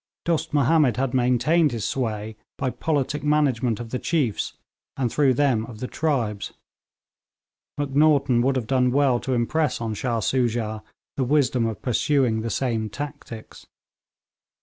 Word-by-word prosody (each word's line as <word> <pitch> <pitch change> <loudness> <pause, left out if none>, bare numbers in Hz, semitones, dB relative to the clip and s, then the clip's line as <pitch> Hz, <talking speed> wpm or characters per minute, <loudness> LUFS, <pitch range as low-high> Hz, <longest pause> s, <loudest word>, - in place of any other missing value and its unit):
Dost 170 -2 0
Mahomed 145 -4 +3
had 135 -1 -1
maintained 130 +6 +3
his 115 -4 -3
sway 110 -4 -3 0.2
by 130 -2 -1
politic 150 -1 -1
management 135 -6 +1
of 115 -1 -7
the 125 - -2
chiefs, 140 -11 -1 0.4
and 125 -4 0
through 135 -4 +3
them 130 -5 +2
of 115 -3 -10
the 125 - -3
tribes. 125 -11 -2 1.2
Macnaghten 140 -3 +3
would 135 +2 +1
have 125 -4 -1
done 125 +1 +2
well 135 -2 +3
to 130 +1 -2
impress 150 +5 0
on 115 -2 -3
Shah 115 +2 -1
Soojah 115 -3 -1 0.4
the 135 - +1
wisdom 130 -3 +2
of 110 -3 -6
pursuing 125 -2 +1
the 115 - -3
same 115 -4 -1
tactics. 145 -3 -8
125 Hz, 145 wpm, -24 LUFS, 115-145 Hz, 1.2 s, Mahomed